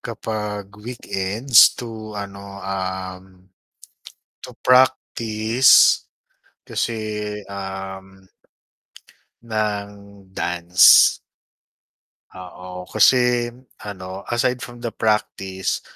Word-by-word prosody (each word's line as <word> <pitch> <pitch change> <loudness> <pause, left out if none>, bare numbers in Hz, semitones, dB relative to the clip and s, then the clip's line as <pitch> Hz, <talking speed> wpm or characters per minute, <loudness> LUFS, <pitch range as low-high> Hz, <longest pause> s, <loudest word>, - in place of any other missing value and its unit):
kapag 105 -3 -5
weekends 110 +1 +3
to 110 -3 -8
ano, 100 -1 -8
um, 95 -1 -6 0.9
to - - -9
practice 120 -2 +4 0.6
kasi 105 -2 -4
um 95 -1 -8 1.2
ng 105 -3 -2 0.5
dance. 90 +1 +5 1.1
Oo, 90 0 -10
kasi 120 +2 +3 0.3
ano 95 -2 -8
aside 120 +1 0
from 120 0 -10
the 120 -1 -5
practice, 95 -3 -2
105 Hz, 70 wpm, -21 LUFS, 95-115 Hz, 1.2 s, dance